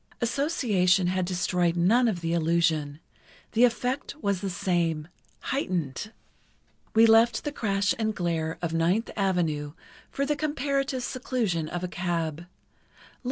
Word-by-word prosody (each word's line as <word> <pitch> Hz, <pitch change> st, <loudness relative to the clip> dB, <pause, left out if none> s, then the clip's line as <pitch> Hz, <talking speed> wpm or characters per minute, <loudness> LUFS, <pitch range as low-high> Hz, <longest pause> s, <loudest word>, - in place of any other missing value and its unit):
Association 230 Hz, -, +2 dB
had 185 Hz, 0 st, 0 dB
destroyed 175 Hz, -1 st, 0 dB
none 225 Hz, +9 st, +4 dB
of 185 Hz, -6 st, -1 dB
the 165 Hz, 0 st, -1 dB
illusion. 160 Hz, -3 st, +1 dB, 0.5 s
The 235 Hz, +2 st, +5 dB
effect 250 Hz, +4 st, -2 dB
was 200 Hz, -, -1 dB
the 200 Hz, -, -2 dB
same—heightened. 175 Hz, -, -2 dB, 0.8 s
We 225 Hz, +1 st, +7 dB
left 225 Hz, +1 st, +5 dB
the 295 Hz, -, -2 dB
crash 200 Hz, -4 st, 0 dB
and 220 Hz, -1 st, 0 dB
glare 165 Hz, -2 st, -2 dB
of 165 Hz, -1 st, -1 dB
Ninth 175 Hz, +7 st, +1 dB
Avenue 165 Hz, -7 st, 0 dB, 0.4 s
for 275 Hz, -, -2 dB
the 295 Hz, +1 st, 0 dB
comparative 275 Hz, -3 st, -1 dB
seclusion 225 Hz, -12 st, -2 dB
of 175 Hz, 0 st, -4 dB
a -, -, -1 dB
cab. 170 Hz, -2 st, -3 dB
185 Hz, 125 wpm, -27 LUFS, 170-235 Hz, 0.8 s, We